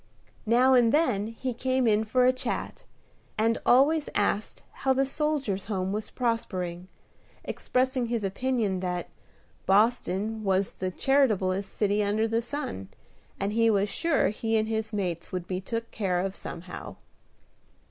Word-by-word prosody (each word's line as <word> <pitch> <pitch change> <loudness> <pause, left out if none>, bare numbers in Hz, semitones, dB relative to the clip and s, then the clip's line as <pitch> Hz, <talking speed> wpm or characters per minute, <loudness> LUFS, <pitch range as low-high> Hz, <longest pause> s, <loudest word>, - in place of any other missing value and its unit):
Now 250 +4 +5
and 240 -3 +5
then 245 -10 +2
he 240 +3 -4
came 255 +1 0
in 215 -1 +3
for 250 +3 +3
a 255 - +5
chat, 255 - -4 0.5
and 225 +1 +2
always 290 +5 +4
asked 205 +1 0 0.2
how 265 -1 +3
the 270 +1 +2
Soldiers' 275 -9 -1
Home 190 -3 -2
was 210 +1 -3
prospering; 185 -7 -2 0.6
expressing 255 -1 0
his 230 -2 -2
opinion 210 -1 0
that 180 -1 -3 0.6
"Boston 215 0 +2
was 195 -1 +1
the 185 - -3
charitablest 200 -6 +1
city 205 0 +1
under 210 +2 +1
the 225 +1 0
sun, 235 - -5 0.5
and 200 +1 -1
he 230 0 +4
was 205 -1 +2
sure 330 +4 +2
he 225 +2 -1
and 215 0 +1
his 220 0 -2
mates 180 -5 -3
would 180 -2 -3
be 185 +1 -3
took 230 +3 -4
care 185 -4 0
of 195 +1 -3
somehow." 175 +1 -8
220 Hz, 145 wpm, -27 LUFS, 195-250 Hz, 0.6 s, Now